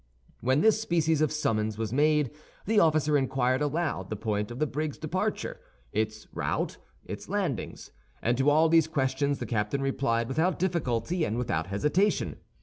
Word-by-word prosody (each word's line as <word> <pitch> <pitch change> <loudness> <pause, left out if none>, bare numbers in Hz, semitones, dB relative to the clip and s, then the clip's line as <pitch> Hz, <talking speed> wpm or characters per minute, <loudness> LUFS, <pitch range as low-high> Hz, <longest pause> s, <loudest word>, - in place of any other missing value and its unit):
When 130 +4 +2
this 220 +2 +4
species 160 -6 +1
of 155 - +2
summons 110 -8 0
was 110 0 -3
made 150 -1 +3 0.3
the 215 +1 +3
officer 155 -3 +3
inquired 130 0 +1
aloud 150 - -1
the 110 - -2
point 105 0 -2
of 120 - -7
the 155 - +1
brig's 150 +1 -3
departure, 185 +7 -2 0.3
its 110 0 -2
route, - - -2 0.3
its - - -7
landings; - - -3 0.3
and 120 +2 +1
to 135 +2 +4
all 155 +2 +5
these 165 -1 +4
questions 140 -1 0
the - - -4
captain 110 +4 -1
replied 115 -4 0
without 160 +8 +1
difficulty 170 -3 0
and 115 -6 -1
without 90 -10 -1
hesitation. 150 - +1
140 Hz, 160 wpm, -28 LUFS, 115-160 Hz, 0.3 s, all